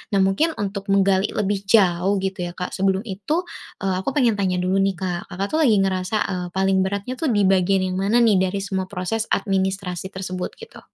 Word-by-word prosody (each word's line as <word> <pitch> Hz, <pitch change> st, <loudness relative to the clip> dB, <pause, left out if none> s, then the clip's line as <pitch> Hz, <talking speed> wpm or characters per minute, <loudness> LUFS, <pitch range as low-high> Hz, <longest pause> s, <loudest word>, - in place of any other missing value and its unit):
Nah, 195 Hz, -, +4 dB
mungkin 305 Hz, +13 st, +1 dB
untuk 200 Hz, 0 st, -4 dB
menggali 195 Hz, 0 st, +3 dB
lebih 205 Hz, -1 st, 0 dB
jauh, 195 Hz, -2 st, +3 dB
gitu, 190 Hz, -1 st, -3 dB
ya, 175 Hz, -1 st, -3 dB
Kak, 180 Hz, -, -4 dB
sebelum 195 Hz, +1 st, 0 dB
itu, 230 Hz, -, -2 dB, 0.4 s
eee, 190 Hz, -1 st, +1 dB
aku 270 Hz, +9 st, -3 dB
pengen 235 Hz, -7 st, +2 dB
tanya 185 Hz, -2 st, +1 dB
dulu 190 Hz, +2 st, +1 dB
nih, 195 Hz, -1 st, +1 dB
Kak. 175 Hz, -2 st, -4 dB
Kakak 195 Hz, +3 st, -3 dB
tuh 315 Hz, -, +1 dB
lagi 245 Hz, -9 st, +4 dB
ngerasa, 185 Hz, +2 st, -1 dB
eee, 180 Hz, -2 st, -3 dB
paling 190 Hz, 0 st, +2 dB
beratnya 200 Hz, +6 st, -4 dB
tuh 320 Hz, -, 0 dB
di 205 Hz, -5 st, +2 dB
bagian 190 Hz, 0 st, +3 dB
yang 185 Hz, 0 st, -2 dB
mana 225 Hz, +5 st, +3 dB
nih, 190 Hz, -4 st, +4 dB
dari 195 Hz, +1 st, -3 dB
semua 190 Hz, -2 st, -3 dB
proses 205 Hz, +4 st, -3 dB
administrasi 190 Hz, -2 st, -1 dB
tersebut, 185 Hz, -1 st, -5 dB
gitu? 460 Hz, -, -12 dB
195 Hz, 205 wpm, -22 LUFS, 185-205 Hz, 0.4 s, Nah